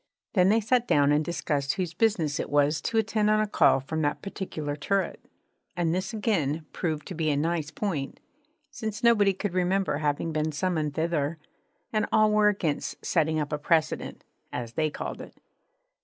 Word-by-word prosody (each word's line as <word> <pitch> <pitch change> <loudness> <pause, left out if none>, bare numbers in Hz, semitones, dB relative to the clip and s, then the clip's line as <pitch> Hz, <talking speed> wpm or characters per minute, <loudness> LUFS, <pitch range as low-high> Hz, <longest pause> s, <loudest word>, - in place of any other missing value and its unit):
Then 185 -2 +4
they 220 +2 +4
sat 240 +2 +1
down 145 0 +4
and 150 +1 +3
discussed 145 -4 -1
whose 180 -3 -3
business 170 -10 +1
it - - -3
was 145 +1 +2
to 225 - -1
attend 220 -1 +2
on 215 0 +4
a 215 - +2
call 205 - +4
from 160 +4 -3
that 145 -1 -1
particular 160 -7 -4
turret; 195 +6 -1 0.5
and 165 -2 +1
this 185 +2 -2
again 165 -9 -1
proved 155 -4 -2
to 190 - -5
be 160 -2 -1
a 145 - +1
nice 160 0 -1
point, 160 -7 -3 0.5
since 220 -6 -5
nobody 210 -4 +5
could 190 0 -3
remember 185 -2 +1
having 150 +2 -1
been 155 0 -1
summoned 155 -3 -1
thither, 160 -1 0 0.6
and 215 0 +1
all 215 -1 +4
were 210 0 +4
against 180 -8 -1
setting 160 -2 +1
up 150 0 -3
a 150 - -1
precedent 155 +1 0 0.3
(as 120 -2 -5
they 155 -1 +1
called - - -6
it). - - -12
165 Hz, 180 wpm, -27 LUFS, 150-205 Hz, 0.6 s, nobody